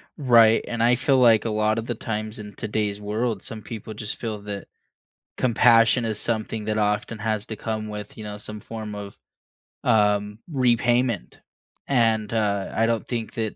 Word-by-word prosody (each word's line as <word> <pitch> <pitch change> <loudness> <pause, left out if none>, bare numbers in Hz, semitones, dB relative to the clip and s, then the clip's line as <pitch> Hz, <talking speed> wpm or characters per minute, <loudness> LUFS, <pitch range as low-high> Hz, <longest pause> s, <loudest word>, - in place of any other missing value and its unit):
Right, 115 -6 +5
and 120 -1 -3
I 120 +1 +5
feel 135 +2 +2
like 115 -4 +5
a - - 0
lot 110 0 +1
of 115 - -2
the 120 - -2
times 110 +1 -4
in 105 -1 -8
today's 105 -2 -2
world, 105 0 -2
some 115 -4 -7
people 110 +1 -7
just 105 0 -5
feel 110 -3 -4
that 100 -1 -6 0.7
compassion 115 -1 +4
is 110 -2 -1
something 110 -1 -2
that 110 0 -1
often 105 +1 0
has 110 -1 -1
to 110 - -5
come 110 0 -4
with, 105 0 -7
you 110 - -7
know, 105 0 -6
some 105 +1 -7
form 110 0 -7
of, 100 -1 -8 0.7
um, 105 -1 +2
repayment. 120 - +1 0.5
And, 115 -5 +2
uh, 100 -3 0
I 115 - +3
don't 115 -1 -1
think 115 -3 -4
that 110 -2 -3
110 Hz, 175 wpm, -24 LUFS, 105-115 Hz, 0.7 s, Right